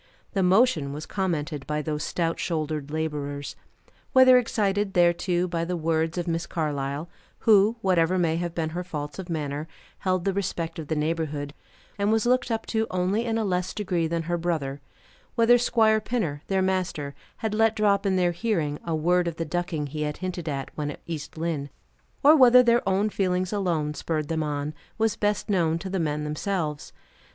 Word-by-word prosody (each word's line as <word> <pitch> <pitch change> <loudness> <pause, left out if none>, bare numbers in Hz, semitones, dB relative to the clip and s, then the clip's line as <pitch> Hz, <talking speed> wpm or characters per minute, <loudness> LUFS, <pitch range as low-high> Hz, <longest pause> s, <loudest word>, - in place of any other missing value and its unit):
The 195 - +1
motion 180 - +3
was 150 +2 -6
commented 155 -7 -2
by 150 0 -1
those 150 -1 -2
stout 165 -1 -1
shouldered 155 -3 -2
laborers. 145 -2 -3 0.6
Whether 255 -1 +8
excited 205 -4 0
thereto 175 +1 +2
by 170 -1 -2
the 175 +1 -2
words 160 +1 0
of 175 0 -2
Miss 165 0 -1
Carlyle 145 -1 -2 0.3
who, 215 0 +5
whatever 185 -2 +2
may 165 -2 +1
have 175 -1 -3
been 160 -2 -1
her 175 +2 -3
faults 150 -2 -6
of 185 -1 -6
manner, 150 -1 -3 0.3
held 185 -2 0
the 195 - +1
respect 170 -4 -3
of 155 - -6
the 160 - -1
neighborhood, 150 -2 -2 0.5
and 200 +1 +2
was 225 0 +2
looked 250 +1 +2
up 225 -1 -1
to 220 -1 0
only 185 +5 0
in 225 -1 0
a 220 - 0
less 180 -1 -1
degree 180 -5 0
than 165 0 -2
her 175 +1 -1
brother; 150 -5 -2 0.5
whether 240 +1 +5
Squire 220 -2 +3
Pinner, 180 -12 -2
their 190 -1 +1
master, 185 -7 -1 0.2
had 220 -2 -2
let 225 0 +3
drop, 200 -2 +2
in 195 -2 +1
their 180 -1 +2
hearing, 170 -7 -1
a 165 -1 -1
word 175 +3 +2
of 170 - -3
the 165 - -3
ducking 165 -2 -2
he 150 +2 -5
had 150 0 -2
hinted 180 -3 -4
at, 135 -2 -4
when 150 -1 -3
at 145 - -8
East 155 -2 -6
Lynne, 160 -3 -2 0.5
or 300 +3 +8
whether 250 -3 +8
their 235 0 +4
own 200 +3 +1
feelings 185 -1 0
alone 170 -7 0
spurred 155 -1 -3
them 160 -1 0
on, 150 0 -2 0.2
was 225 -1 +1
best 205 -1 0
known 170 -5 +2
to 190 +2 -6
the 190 - -1
men 150 -2 -1
themselves. 150 0 -3
175 Hz, 190 wpm, -26 LUFS, 155-200 Hz, 0.6 s, Whether